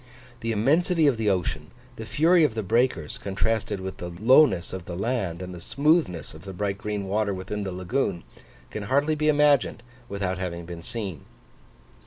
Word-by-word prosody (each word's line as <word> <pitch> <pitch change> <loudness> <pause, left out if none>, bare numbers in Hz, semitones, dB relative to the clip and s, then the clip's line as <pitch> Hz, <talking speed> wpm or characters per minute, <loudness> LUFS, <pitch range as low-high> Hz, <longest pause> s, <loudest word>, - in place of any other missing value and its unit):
The 115 -1 -2
immensity 155 - +2
of 140 -5 +3
the 110 -2 +1
ocean, 80 -5 -1 0.3
the 110 -3 -8
fury 165 +2 +4
of 135 -7 +2
the 110 - -2
breakers, 110 -7 0
contrasted 100 +1 -1
with 95 0 -6
the 90 - -6
lowness 105 - +4
of 95 -2 -6
the 85 - -6
land 95 -5 -2
and 90 0 -7
the 90 - -8
smoothness 140 - +1
of 80 - -12
the 95 +1 -8
bright 100 +1 -2
green 105 -2 -3
water 100 0 0
within 95 +3 -4
the 95 -2 -3
lagoon, 90 +1 -2 0.5
can 105 -1 -5
hardly 145 +4 +3
be 155 0 0
imagined 145 -5 +3 0.3
without 95 -2 -2
having 85 -2 -4
been 85 -1 -8
seen. 95 - -5
105 Hz, 180 wpm, -25 LUFS, 90-130 Hz, 0.5 s, fury